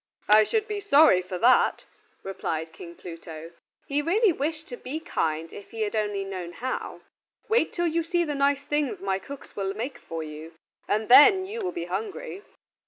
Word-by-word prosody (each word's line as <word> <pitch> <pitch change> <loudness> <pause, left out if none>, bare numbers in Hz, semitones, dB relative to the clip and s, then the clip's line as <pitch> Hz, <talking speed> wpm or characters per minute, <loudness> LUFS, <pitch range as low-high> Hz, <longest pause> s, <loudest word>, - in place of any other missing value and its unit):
"I 215 +1 +7
should 440 - 0
be 420 -1 -3
sorry 305 - +6
for 185 0 -6
that," 245 +7 +3 0.4
replied 160 -4 -4
King 170 +1 -10
Pluto. 165 -1 -9 0.3
He 285 +1 0
really 390 +7 +3
wished 310 +2 -3
to 245 - -5
be 270 +6 -5
kind 160 - -2
if 200 - -10
he 225 - -6
had 215 0 -1
only 205 -2 -1
known 185 -3 -6
how. 255 +5 -5 0.5
"Wait 440 -6 +2
till 345 - -1
you 335 0 +1
see 345 +1 +1
the 300 -3 -2
nice 280 0 +1
things 295 -2 -1
my 195 -1 0
cook 280 +8 -10
will 195 0 -2
make 245 +6 -5
for 165 -1 -6
you, 155 +2 -9 0.3
and 215 +1 0
then 375 +10 +8
you 440 +4 -5
will 370 -3 -2
be 345 - -5
hungry." 405 -2 -5
255 Hz, 185 wpm, -26 LUFS, -, 0.5 s, then